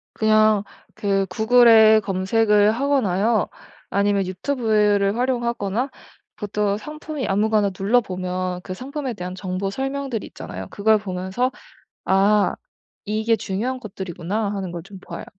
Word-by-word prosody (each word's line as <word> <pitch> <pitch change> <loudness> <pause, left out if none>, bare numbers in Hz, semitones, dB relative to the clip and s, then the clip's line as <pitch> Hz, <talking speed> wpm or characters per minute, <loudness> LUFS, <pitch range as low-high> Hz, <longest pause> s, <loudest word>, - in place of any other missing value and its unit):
그냥 215 -1 +4 0.3
그 195 -1 0
구글에 220 +1 +6
검색을 205 +2 +2
하거나요 230 -5 +1 0.4
아니면 200 0 +1
유튜브를 210 -1 +1
활용하거나 240 -1 -1 0.5
보통 205 -1 -1
상품이 300 +1 -6
아무거나 210 0 +2
눌러보면 185 -4 -1
그 185 - -6
상품에 270 +3 -5
대한 180 -2 -6
정보 185 +1 -3
설명들이 270 0 -3
있잖아요. 95 +1 -8
그걸 215 +1 +3
보면서 190 +5 -2 0.5
'아 200 +2 +3 0.5
이게 220 +2 +1
중요한 220 +5 -3
것들이구나.' 195 0 -4
하는 190 -3 -4
걸 170 -1 -6
좀 195 +2 -12
봐요. 170 -2 -8
210 Hz, 295 characters per minute, -22 LUFS, 190-230 Hz, 0.5 s, 구글에